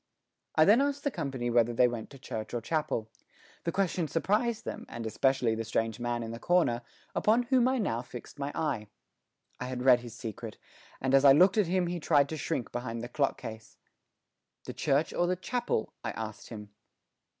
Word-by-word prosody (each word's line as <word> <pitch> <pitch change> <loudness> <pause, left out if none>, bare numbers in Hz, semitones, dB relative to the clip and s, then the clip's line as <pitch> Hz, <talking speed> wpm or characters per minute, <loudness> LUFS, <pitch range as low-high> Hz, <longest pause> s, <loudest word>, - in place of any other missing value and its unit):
I 155 - +6
then 215 +6 +6
asked 285 0 -1
the 285 - 0
company 135 - -3
whether 120 0 +3
they 125 +1 +5
went 120 -2 -5
to 140 - -12
church 110 -3 -6
or 120 - -1
to - - -14
chapel. 150 -9 -1 0.5
The 170 - +1
question 180 -3 0
surprised 210 - 0
them, - - -6
and 115 -1 -6
especially 125 +1 +2
the 115 0 -2
strange 115 0 -1
man 120 -1 -2
in 115 - -5
the 115 - -6
corner, 165 -9 +2 0.3
upon 225 +3 +3
whom 250 0 +3
I 260 +1 +2
now 120 - 0
fixed 125 +3 -10
my 140 +1 -2
eye. 140 -10 -1 0.7
I 125 - -3
had 125 0 -4
read 125 -2 +7
his 120 -1 -10
secret, 115 -1 -7 0.4
and 130 0 0
as 135 0 +6
I 140 -1 +9
looked 185 +8 +5
at 200 - +3
him 180 +1 +1
he 175 0 -3
tried 145 -3 +3
to 160 - -4
shrink 130 -4 -3
behind 120 -1 -4
the 120 - -6
clock 140 +2 0
case. 110 -1 -9 0.9
"The - - -6
church 145 +3 +1
or 175 - +1
the 180 - +1
chapel?" 235 - -2
I - - -2
asked 110 -1 -6
him. 105 -3 -9
135 Hz, 205 wpm, -30 LUFS, 115-175 Hz, 0.9 s, I